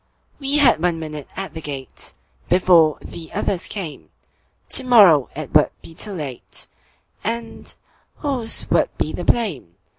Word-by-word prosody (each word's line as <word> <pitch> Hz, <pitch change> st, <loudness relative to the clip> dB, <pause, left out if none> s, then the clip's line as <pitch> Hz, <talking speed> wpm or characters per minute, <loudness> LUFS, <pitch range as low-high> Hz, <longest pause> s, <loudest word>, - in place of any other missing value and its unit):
We 280 Hz, +1 st, 0 dB
had 255 Hz, -, +4 dB
one 175 Hz, -1 st, +1 dB
minute 150 Hz, -3 st, -7 dB
at 195 Hz, 0 st, -5 dB
the 160 Hz, -, -7 dB
gate, 140 Hz, -3 st, -4 dB, 0.3 s
Before 175 Hz, -4 st, +4 dB
the 165 Hz, -1 st, -9 dB
others 185 Hz, -2 st, -1 dB
came; 175 Hz, -8 st, -6 dB, 0.6 s
To 265 Hz, -, +6 dB
morrow 200 Hz, -, +6 dB
it 155 Hz, -2 st, -7 dB
would 150 Hz, -1 st, +5 dB
be 165 Hz, -, -11 dB
too 205 Hz, +5 st, -2 dB
late, 145 Hz, -8 st, -3 dB, 0.6 s
And 230 Hz, 0 st, -1 dB, 0.4 s
whose 255 Hz, -6 st, +1 dB
would -, -, +3 dB
be -, -, -2 dB
the -, -, -5 dB
blame! 170 Hz, -, 0 dB
175 Hz, 145 wpm, -21 LUFS, 150-225 Hz, 0.6 s, To